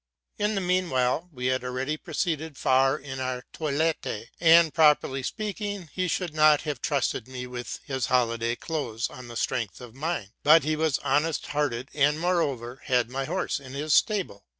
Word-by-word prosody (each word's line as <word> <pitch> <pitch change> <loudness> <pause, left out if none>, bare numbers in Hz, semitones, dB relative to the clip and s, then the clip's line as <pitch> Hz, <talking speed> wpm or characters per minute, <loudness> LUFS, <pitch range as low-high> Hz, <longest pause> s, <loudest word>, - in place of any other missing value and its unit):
'' - - -49
In 210 +1 +1
the 195 - 0
mean 185 0 +1
while 130 +7 0
we 125 -4 -6
had 130 0 +1
already 130 +4 -2
proceeded 160 -2 -3
far 135 +2 +3
in 135 -2 -7
our 130 -1 -3
toilet: 155 +1 -1 0.3
and, 165 -1 +6
properly 150 -4 +4
speaking, 205 - -4
he 185 -1 -1
should 175 -1 -2
not 155 -1 +5
have 150 -5 -4
trusted 140 -5 -1
me 130 -1 -6
with 125 -1 -6
his 135 -2 -2
holiday 115 -2 +1
clothes 130 -7 -3
on 125 -1 -10
the 120 -1 -7
strength 115 -7 -2
of 120 -3 -11
mine; 135 - -3
but 155 +1 +6
he 155 +2 0
was 155 -3 +1
honest 145 +3 +1
hearted, 135 -4 -2
and, 150 +1 +2
moreover, 140 -9 -1
had 125 -2 +1
my 135 +1 -2
horse 175 -1 -2
in 130 -2 -11
his 145 +2 -1
stable. 195 - +1
145 Hz, 180 wpm, -26 LUFS, 125-160 Hz, 0.3 s, and